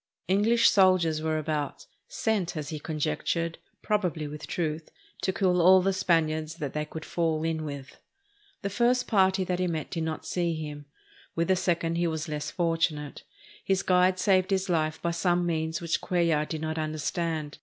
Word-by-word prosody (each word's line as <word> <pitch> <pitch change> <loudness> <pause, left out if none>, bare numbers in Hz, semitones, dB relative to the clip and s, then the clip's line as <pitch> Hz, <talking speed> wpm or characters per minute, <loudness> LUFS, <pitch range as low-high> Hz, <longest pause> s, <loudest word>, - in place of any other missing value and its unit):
EngHsh 215 +5 +3
soldiers 185 -5 +4
were 155 0 0
about, 150 -2 -3 0.2
sent, 205 -7 -1
as 150 -2 -4
he 155 - -4
conjectured, 160 - -2 0.2
probably 180 -8 0
with 150 +1 -8
truth, 160 -2 -3 0.3
to 190 - +1
kill 180 -1 +2
all 185 +2 +7
the 195 +1 +1
Spaniards 160 -4 +1
that 145 -5 -5
they 150 0 -2
could 155 +1 -8
fall 160 -2 0
in 160 -1 -1
with. 140 -2 -8 0.6
The 200 - -2
first 245 +4 +2
party 190 -2 +3
that 180 -1 -2
he 185 - +1
met 160 -3 -3
did 165 - -2
not 160 0 -3
see 170 -2 -1
him. 150 -2 -6 0.5
With 165 +1 0
the 190 - +5
second 170 -2 0
he 170 0 +1
was 160 0 -3
less 150 -1 -3
fortunate. 165 -4 -1 0.4
His 195 0 +1
guide 185 0 +3
saved 185 -1 +3
his 190 -1 0
life 155 -2 0
by 170 - +1
some 175 +1 +1
means 160 -1 -1
which 170 -1 -1
Cuellar 170 -4 +1
did 160 -1 -4
not 160 0 -2
understand. 155 0 -3
165 Hz, 175 wpm, -28 LUFS, 155-185 Hz, 0.6 s, all